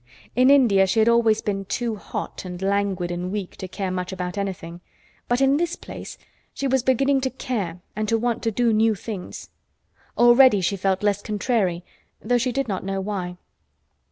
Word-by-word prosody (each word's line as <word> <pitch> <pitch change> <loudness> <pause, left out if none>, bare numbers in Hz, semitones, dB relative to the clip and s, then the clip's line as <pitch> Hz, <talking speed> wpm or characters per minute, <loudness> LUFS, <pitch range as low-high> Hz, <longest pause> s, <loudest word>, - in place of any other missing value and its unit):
In 255 +1 +5
India 225 -9 +5
she 190 - -1
had 220 0 +4
always 230 -2 +3
been 195 -1 -2
too 230 +3 -2
hot 205 - -6
and 180 -1 -7
languid 195 -2 0
and 175 +1 -3
weak 200 -3 -4
to 190 - -6
care 190 0 -4
much 180 0 -3
about 180 0 -4
anything, 180 -4 -5 0.5
but 245 +2 +1
in 270 +1 +4
this 345 +2 -1
place - - -9 0.4
she 275 - -3
was 265 -1 +2
beginning 270 +2 +2
to 260 - 0
care 205 -10 -4
and 215 0 -2
to 230 - +3
want 235 0 -1
to 225 - 0
do 230 +1 +1
new 220 0 +3
things. 195 -2 -7 0.7
Already 240 -2 +6
she 190 +2 0
felt 190 0 0
less 205 -1 +1
"contrary," 205 -5 -1 0.4
though 245 0 +1
she 250 +1 0
did 275 +1 -1
not 195 -3 -3
know 195 0 -2
why. 190 -3 -4
210 Hz, 185 wpm, -23 LUFS, 190-240 Hz, 0.7 s, Already